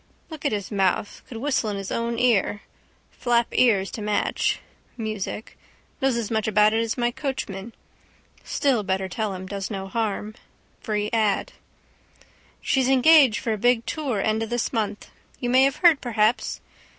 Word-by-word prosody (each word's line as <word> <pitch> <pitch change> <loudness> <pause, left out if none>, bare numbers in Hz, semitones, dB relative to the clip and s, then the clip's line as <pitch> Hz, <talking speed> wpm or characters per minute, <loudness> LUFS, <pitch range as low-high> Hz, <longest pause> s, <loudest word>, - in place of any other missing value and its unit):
Look 310 -1 -9
at - - +2
his 205 -2 -3
mouth. 195 0 0
Could 235 - -8
whistle 255 -3 0
in 205 - -3
his 195 -1 -6
own 235 0 -1
ear. 220 -4 +2 0.5
Flap 240 -1 +1
ears 200 -7 +3
to 220 - -6
match. 210 0 0 0.4
Music. 215 -1 -5 0.5
Knows 265 -3 +2
as 230 -2 -3
much 220 -1 0
about 210 0 +4
it 225 - +2
as 230 +1 -2
my 240 -1 +1
coachman. 235 -6 -5 0.7
Still 265 -6 +1
better 190 -1 -1
tell 205 +1 -3
him. 185 0 -7
Does 195 0 -5
no 195 -3 -5
harm. 215 0 -2 0.5
Free 210 -1 -2
ad. 215 -3 +1 1.1
—She's 265 -1 +2
engaged 270 -2 +6
for 225 - -1
a 215 - -4
big 245 +1 +2
tour 275 -9 -2
end 215 +2 0
of 225 - -3
this 240 +1 -1
month. 210 -3 -3 0.3
You 245 -1 -1
may 260 +1 +6
have 275 0 +1
heard 325 -5 +7
perhaps. 225 -1 0
220 Hz, 165 wpm, -24 LUFS, 205-245 Hz, 1.1 s, heard